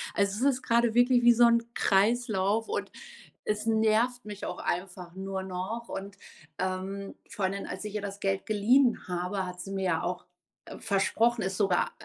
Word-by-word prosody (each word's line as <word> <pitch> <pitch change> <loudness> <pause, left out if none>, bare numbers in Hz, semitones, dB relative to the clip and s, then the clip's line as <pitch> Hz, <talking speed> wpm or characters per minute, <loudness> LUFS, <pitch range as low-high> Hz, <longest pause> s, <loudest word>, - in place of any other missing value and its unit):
Also, 200 +6 +1
es 270 -3 +2
ist 260 - -15
grade 235 -1 +2
wirklich 245 0 +5
wie 240 0 +8
so 240 +1 +6
'n 235 0 +4
Kreislauf 215 0 +2
und - - -3 0.5
es 210 0 -1
nervt 225 +2 +2
mich 205 -1 -7
auch - - -4
einfach 180 -1 -4
nur 190 0 -4
noch. 190 +6 -5
Und, 200 +1 -6 0.4
ähm, 190 +1 -3
vor 210 -4 -2
allem, 195 +1 -2
als 185 +3 -6
ich 210 0 -6
ihr 210 - -1
das 200 0 -6
Geld 195 -1 -1
geliehen 235 +4 +3
habe, 180 +2 -2
hat 180 0 -7
sie 195 - -8
mir 195 -1 -2
ja 165 -3 +1
auch 180 0 -3 0.5
versprochen, 225 +3 +1
es 190 0 -2
sogar 195 -4 +2
200 Hz, 180 wpm, -28 LUFS, 190-230 Hz, 0.5 s, wie